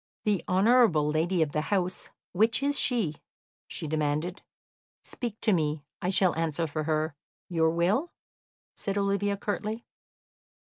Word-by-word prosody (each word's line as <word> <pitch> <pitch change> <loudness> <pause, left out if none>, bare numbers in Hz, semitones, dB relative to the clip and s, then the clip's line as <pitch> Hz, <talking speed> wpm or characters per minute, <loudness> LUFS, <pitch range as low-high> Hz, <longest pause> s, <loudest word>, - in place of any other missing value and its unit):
"The 205 -4 +1
honourable 195 -5 +4
lady 165 +2 +2
of 150 - -3
the 150 - 0
house, 185 +1 -1 0.2
which 220 +7 +2
is 285 0 +1
she?" 210 - +1 0.5
she - - -5
demanded. 155 +4 -1 0.6
"Speak 230 -3 -4
to 215 - +3
me; 150 -3 0 0.2
I 180 - 0
shall 185 -2 +3
answer 165 0 0
for 155 0 -3
her. 155 0 0 0.4
Your 165 -2 +3
will?" 190 - +1 0.6
said 200 0 -3
Olivia 200 0 +1
curtly. 215 +3 -3
180 Hz, 135 wpm, -28 LUFS, 155-210 Hz, 0.6 s, honourable